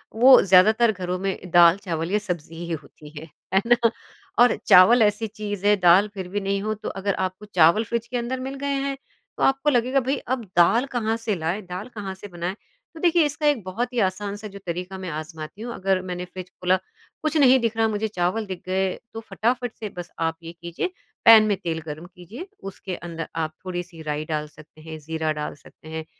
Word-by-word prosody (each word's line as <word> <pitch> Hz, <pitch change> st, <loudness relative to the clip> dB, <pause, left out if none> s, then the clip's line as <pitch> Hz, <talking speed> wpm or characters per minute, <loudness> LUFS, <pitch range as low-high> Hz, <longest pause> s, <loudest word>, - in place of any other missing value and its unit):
वो 255 Hz, +3 st, +8 dB
ज़्यादातर 215 Hz, +5 st, +5 dB
घरों 180 Hz, -2 st, -3 dB
में 185 Hz, -2 st, -4 dB
दाल 170 Hz, +1 st, +7 dB
चावल 165 Hz, -1 st, -3 dB
या 210 Hz, -, +3 dB
सब्ज़ी 175 Hz, -5 st, -5 dB
ही 170 Hz, -, -6 dB
होती 150 Hz, +1 st, -15 dB
है। 160 Hz, -, -9 dB, 0.3 s
है 195 Hz, -, +4 dB
ना? 240 Hz, -, +6 dB, 0.6 s
और 245 Hz, -1 st, +6 dB
चावल 190 Hz, +7 st, +8 dB
ऐसी 210 Hz, +2 st, +1 dB
चीज़ 205 Hz, -2 st, -6 dB
है, 205 Hz, 0 st, +6 dB
दाल 180 Hz, +2 st, +5 dB
फिर 190 Hz, -3 st, -6 dB
भी 200 Hz, +3 st, -2 dB
नहीं 195 Hz, 0 st, -1 dB
हो 215 Hz, +1 st, -1 dB
तो 215 Hz, 0 st, -6 dB
अगर 195 Hz, +1 st, -2 dB
आपको 185 Hz, +3 st, -13 dB
चावल 180 Hz, +1 st, +4 dB
फ्रिज 235 Hz, +1 st, -3 dB
के 245 Hz, +1 st, -3 dB
अंदर 245 Hz, +2 st, -3 dB
मिल 265 Hz, +1 st, -5 dB
गए -, -, -1 dB, 0.2 s
हैं, 275 Hz, -1 st, -3 dB, 0.4 s
तो -, -, -1 dB
आपको 270 Hz, +2 st, +3 dB
लगेगा 255 Hz, 0 st, +2 dB
भई 275 Hz, -, +2 dB
अब 250 Hz, -1 st, -1 dB
दाल 225 Hz, +9 st, +5 dB
कहाँ 225 Hz, -1 st, 0 dB
से 210 Hz, -, +2 dB
लाए? 170 Hz, +4 st, -2 dB
दाल 180 Hz, +1 st, -7 dB
कहाँ 200 Hz, -3 st, -5 dB
से 195 Hz, +2 st, -10 dB
बनाए? 175 Hz, 0 st, -4 dB, 0.4 s
तो 325 Hz, -, -11 dB
देखिए 340 Hz, -1 st, +4 dB
इसका 295 Hz, +1 st, -3 dB
एक 285 Hz, -8 st, +2 dB
बहुत 235 Hz, +7 st, -3 dB
ही 245 Hz, -, 0 dB
आसान-सा 205 Hz, +2 st, -6 dB
जो 200 Hz, -1 st, -10 dB
तरीका 180 Hz, +2 st, -4 dB
मैं 185 Hz, -1 st, -6 dB
आज़माती 155 Hz, +4 st, -9 dB
हूँ 240 Hz, +1 st, -5 dB
अगर 190 Hz, -3 st, 0 dB
मैंने 180 Hz, -1 st, -5 dB
फ्रिज 180 Hz, 0 st, -9 dB
खोला 180 Hz, +1 st, +1 dB, 0.4 s
कुछ 310 Hz, 0 st, -1 dB
नहीं 265 Hz, -3 st, +6 dB
दिख 230 Hz, -2 st, -1 dB
रहा 225 Hz, 0 st, +3 dB
मुझे 215 Hz, 0 st, -1 dB
चावल 200 Hz, +2 st, -1 dB
दिख 185 Hz, -2 st, -7 dB
गए, 190 Hz, 0 st, 0 dB, 0.2 s
तो 225 Hz, -, -5 dB
फटाफट 245 Hz, +1 st, -1 dB
से 215 Hz, -, -4 dB
बस 175 Hz, 0 st, -6 dB
आप 165 Hz, 0 st, -1 dB
ये 165 Hz, -, -7 dB
कीजिए। 170 Hz, -, -3 dB, 0.3 s
पैन 225 Hz, -1 st, +10 dB
में 205 Hz, -, +2 dB
तेल 165 Hz, -3 st, -3 dB
गर्म 155 Hz, +2 st, -7 dB
कीजिए 210 Hz, -, -9 dB, 0.2 s
उसके 190 Hz, -1 st, -7 dB
अंदर 165 Hz, -2 st, -6 dB
आप 160 Hz, -1 st, -2 dB
थोड़ी-सी 175 Hz, -2 st, -6 dB
राई 150 Hz, -1 st, -3 dB
डाल 150 Hz, -1 st, -3 dB
सकते 155 Hz, +1 st, -17 dB
हैं, 160 Hz, 0 st, -8 dB
ज़ीरा 160 Hz, +1 st, -2 dB
डाल 150 Hz, 0 st, -5 dB
सकते 150 Hz, +2 st, -18 dB
हैं। 160 Hz, 0 st, -5 dB
190 Hz, 215 wpm, -24 LUFS, 175-225 Hz, 0.6 s, पैन